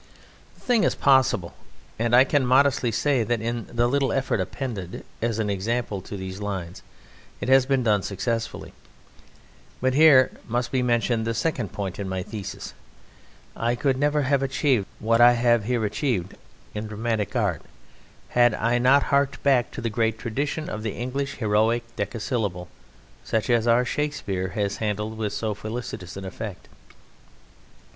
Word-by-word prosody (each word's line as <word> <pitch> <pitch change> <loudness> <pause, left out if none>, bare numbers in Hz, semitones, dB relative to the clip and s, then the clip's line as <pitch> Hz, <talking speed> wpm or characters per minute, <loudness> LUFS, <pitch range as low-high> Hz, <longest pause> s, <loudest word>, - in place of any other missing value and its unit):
The - - -23
thing 240 -4 +2
is - - +2
possible: 130 -10 +3 0.5
and 120 +1 +2
I 125 - +8
can 135 +1 +1
modestly 130 -1 +3
say 135 +3 +1
that 115 +2 0
in 115 0 -3
the 120 0 0
little 135 +2 +1
effort 135 -5 0
appended 95 -2 -5 0.2
as 115 -1 0
an 110 -2 -1
example 105 +1 -2
to 100 - -7
these 95 0 -6
lines 95 -4 -5 0.6
it - - -3
has 130 -1 +5
been 135 -2 +2
done 105 -3 +3
successfully; 115 +4 -3 1.1
but 130 0 +1
here 140 -3 +6 0.2
must 120 +1 -1
be 130 - +1
mentioned 120 -2 +1
the 115 - -1
second 125 - -1
point 100 -2 -5
in 100 -2 -3
my 95 -1 -2
thesis 105 0 -7 0.8
I 120 +1 0
could 135 +1 +1
never 145 +2 +1
have 140 0 +2
achieved 135 -5 +1
what 115 +2 +2
I 120 0 +8
have 120 -2 +2
here 120 -2 0
achieved 100 - -2 0.4
in 105 +1 -4
dramatic 110 +1 -2
art 100 -10 0 0.7
had 120 -2 +4
I 120 +2 +1
not 135 +3 +5
harked 140 -1 0
back 135 -4 +3
to - - -7
the 115 - -1
great 110 0 0
tradition 140 +7 -3
of 105 - -5
the 110 -2 -3
English 135 +4 -3
heroic 110 +2 +1
decasyllable 105 -4 -3 0.5
such 110 +2 -1
as 120 -1 +2
our 120 +2 +4
Shakespeare 110 -11 -2
has 100 -1 -1
handled 105 0 -2
with 105 -2 -1
so 110 -2 -2
felicitous 105 -4 -6
an 95 - -6
effect. 100 0 -7
115 Hz, 160 wpm, -24 LUFS, 105-130 Hz, 1.1 s, I